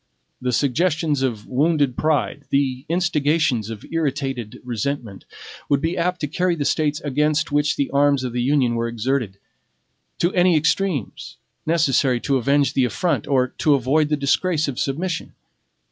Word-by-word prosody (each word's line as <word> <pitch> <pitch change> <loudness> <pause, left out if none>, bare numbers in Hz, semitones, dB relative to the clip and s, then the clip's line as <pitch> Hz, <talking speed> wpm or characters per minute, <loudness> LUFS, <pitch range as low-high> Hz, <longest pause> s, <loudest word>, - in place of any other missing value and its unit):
The 125 0 -1
suggestions 150 +3 +1
of 115 -6 -2
wounded 145 -1 +1
pride, 145 -1 0
the 135 -2 0
instigations 150 - +1
of 110 -2 -8
irritated 135 -7 -2
resentment, 120 -3 -4 0.4
would 140 - +3
be 165 +4 -1
apt 180 +1 -1
to 150 - -1
carry 180 +4 0
the 145 -3 -3
States 150 -1 0
against 150 +2 0
which 145 0 +1
the 140 - -1
arms 140 -1 +3
of 125 -2 -4
the 120 - -1
Union 130 -2 +2
were 115 0 -1
exerted, 115 -3 -2 0.8
to 175 +2 +1
any 180 -2 +4
extremes 155 - -1 0.3
necessary 140 -6 +2
to 140 -2 +1
avenge 140 +3 +2
the 130 - +2
affront 135 - -1
or 130 -2 +2
to 150 -2 +4
avoid 145 +4 +1
the 150 - +1
disgrace 155 +3 +1
of 135 -3 -4
submission. 165 +5 -3
140 Hz, 155 wpm, -21 LUFS, 130-155 Hz, 0.8 s, any